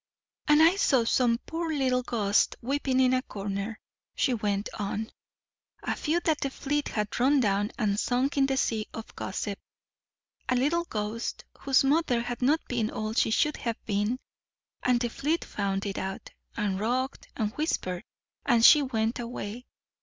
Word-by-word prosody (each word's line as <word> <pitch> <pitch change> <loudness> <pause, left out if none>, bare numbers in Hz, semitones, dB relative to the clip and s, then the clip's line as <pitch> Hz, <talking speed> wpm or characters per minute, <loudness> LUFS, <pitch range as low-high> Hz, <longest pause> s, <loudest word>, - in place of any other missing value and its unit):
"And 300 +1 +6
I 340 +4 +5
saw 265 -10 +3
some 235 0 +3
poor 330 0 -3
little 260 -4 +1
ghosts 215 -5 +1
weeping 265 +1 0
in 255 -1 +4
a 255 - +2
corner," 200 -1 -5 0.4
she 255 - +2
went 205 -2 -1
on; 210 +2 -3 0.7
"a - - -1
few 320 +3 0
that 315 -3 +1
the 275 - 0
fleet 290 +2 -2
had 210 +1 -2
run 275 +3 +4
down 205 -2 +1
and 205 -2 +1
sunk 255 +4 0
in 275 -1 +3
the 270 -1 0
sea 220 -5 0
of 225 - -8
gossip. 200 +1 -4 0.9
A 255 - +3
little 305 +7 +1
ghost 215 -2 -4
whose 275 -1 +3
mother 270 -4 +2
had 245 +1 -5
not 290 +6 +3
been 230 -3 0
all 215 0 -3
she 225 - +2
should 300 +7 +2
have 230 -2 -3
been, 210 +4 0 0.6
and 250 -1 +3
the 240 - 0
fleet 295 +7 -1
found 195 -1 -2
it 195 -1 -3
out, 190 +1 -5 0.3
and 200 -3 -1
rocked, 255 +5 -1
and 215 -2 -1
whispered, 185 - -2 0.4
and 235 -1 +4
she 300 - +9
went 230 -4 -1
away. 235 0 -6
240 Hz, 170 wpm, -28 LUFS, 210-275 Hz, 0.9 s, she